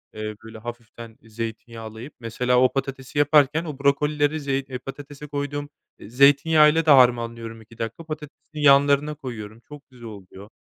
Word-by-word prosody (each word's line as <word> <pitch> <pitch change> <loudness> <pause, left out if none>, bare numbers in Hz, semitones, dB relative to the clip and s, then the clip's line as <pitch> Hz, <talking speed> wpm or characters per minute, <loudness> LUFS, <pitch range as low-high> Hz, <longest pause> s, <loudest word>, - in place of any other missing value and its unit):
Eee, 110 0 -5
böyle, 110 0 -11
hafiften 115 0 -10
zeytinyağlayıp 115 +2 -8
mesela 125 +2 0
o 130 - +3
patatesi 135 +1 -4
yaparken 145 +2 +3
o 150 -4 -7
brokolileri 145 +2 +1
zeyt 135 -2 -4
patatese 145 +1 -9
koyduğum, 145 0 -4 0.3
eee, - - -12
zeytinyağı 145 +4 +5
ile 165 0 0
de 155 - +5
harmanlıyorum 115 -3 +2
2 115 +1 -18
dakika 115 +8 -5
patatesin 155 -2 -8 0.2
yanlarına 145 +1 +4
koyuyorum. 115 -6 -8
Çok 145 +2 -14
güzel 125 -2 -14
oluyor. 100 -1 -12
135 Hz, 145 wpm, -23 LUFS, 115-145 Hz, 0.3 s, zeytinyağı